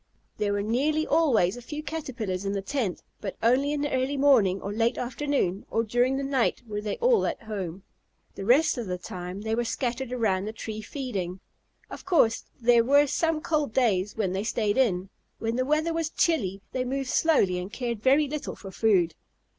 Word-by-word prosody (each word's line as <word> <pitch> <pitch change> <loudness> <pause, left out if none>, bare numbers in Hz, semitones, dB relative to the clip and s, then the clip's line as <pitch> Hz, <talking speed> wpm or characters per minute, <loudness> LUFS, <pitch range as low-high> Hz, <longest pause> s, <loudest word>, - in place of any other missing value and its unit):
There 205 -1 +1
were 200 0 -1
nearly 290 +8 +1
always 240 - +3
a 245 - -9
few 295 +5 -6
Caterpillars 245 - -4
in 195 0 -2
the 200 - -1
tent, 225 -6 -2 0.2
but 195 - -5
only 260 +5 +3
in 295 -1 -1
the 290 - -1
early 260 +2 0
morning 235 -10 +4
or 200 +1 -5
late 230 +2 +1
afternoon 250 -6 -1
or 225 - +1
during 245 +4 +1
the 275 - -2
night 270 -3 0
were 210 -1 -3
they 210 -1 -3
all 475 -1 +3
at - - -4
home. 195 -4 -5 0.5
The 195 - -7
rest 255 +5 +4
of 230 - -4
the 180 0 -2
time 180 +2 -7
they 220 +1 -2
were 240 +2 +1
scattered 240 +2 -2
around 205 -6 0
the 215 - -5
tree 220 -1 -6
feeding. 200 -8 -4 0.5
Of - - -8
course 310 -12 +2
there 235 -1 +5
were 285 +4 +5
some 315 +2 0
cold 300 -7 0
days 210 -6 +1
when 195 -4 0
they 195 +2 -1
stayed 215 -2 0
in. 190 -7 +1 0.3
When 225 +1 -2
the 255 +1 0
weather 310 +3 +1
was 325 -1 -1
chilly 200 - 0
they 255 - -1
moved 265 +1 -3
slowly 195 - +3
and 180 +3 -6
cared 235 -3 -3
very 275 +5 +4
little 300 +1 -4
for 195 - -10
food. 190 -6 +2
235 Hz, 200 wpm, -27 LUFS, 200-280 Hz, 0.5 s, there